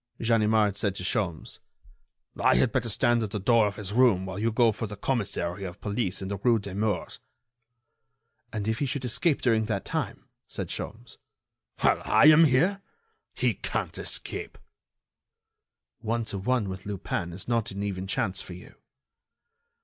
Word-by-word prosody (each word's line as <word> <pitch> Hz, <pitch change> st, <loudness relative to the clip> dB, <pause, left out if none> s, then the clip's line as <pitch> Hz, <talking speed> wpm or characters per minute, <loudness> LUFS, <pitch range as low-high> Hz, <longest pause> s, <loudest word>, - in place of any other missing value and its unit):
Ganimard 110 Hz, -3 st, +3 dB
said 100 Hz, -2 st, 0 dB
to 90 Hz, -, -5 dB
Sholmes: 90 Hz, -5 st, -2 dB, 0.8 s
"I -, -, +3 dB
had 125 Hz, -, +3 dB
better 120 Hz, -3 st, -1 dB
stand 120 Hz, +2 st, +2 dB
at 110 Hz, -, -2 dB
the 105 Hz, +1 st, -3 dB
door 115 Hz, +2 st, +4 dB
of 100 Hz, -, -4 dB
his 100 Hz, -2 st, -5 dB
room 115 Hz, -6 st, +4 dB
while 95 Hz, +1 st, -5 dB
you 115 Hz, +2 st, +1 dB
go 115 Hz, 0 st, +4 dB
for 110 Hz, +1 st, -4 dB
the 105 Hz, -, -7 dB
commissary 100 Hz, -6 st, -2 dB
of 90 Hz, 0 st, -7 dB
police 100 Hz, -2 st, -2 dB
in -, -, -4 dB
the 100 Hz, 0 st, -3 dB
rue 115 Hz, +4 st, +3 dB
Demours." 105 Hz, +1 st, -3 dB, 1.3 s
"And 105 Hz, -2 st, -3 dB
if 110 Hz, +1 st, 0 dB
he 140 Hz, -, 0 dB
should 130 Hz, 0 st, -3 dB
escape 140 Hz, +6 st, +1 dB
during 115 Hz, -3 st, +3 dB
that 105 Hz, -3 st, -2 dB
time?" -, -, -3 dB, 0.2 s
said -, -, -5 dB
Sholmes. 115 Hz, +3 st, -7 dB, 0.6 s
"While -, -, +3 dB
I 110 Hz, +1 st, +4 dB
am 160 Hz, +1 st, +8 dB
here! 170 Hz, +9 st, +2 dB, 0.5 s
He -, -, +1 dB
can't -, -, -3 dB
escape." -, -, -3 dB, 1.4 s
"One 115 Hz, 0 st, -2 dB
to 100 Hz, -2 st, -4 dB
one, 120 Hz, +1 st, 0 dB
with 95 Hz, +1 st, -7 dB
Lupin, 90 Hz, -3 st, -3 dB
is 90 Hz, +4 st, -8 dB
not 115 Hz, -2 st, 0 dB
an 100 Hz, +1 st, -5 dB
even 95 Hz, -2 st, -3 dB
chance 95 Hz, 0 st, -1 dB
for 90 Hz, -, -9 dB
you." 90 Hz, -, -12 dB
105 Hz, 165 wpm, -27 LUFS, 100-120 Hz, 1.4 s, am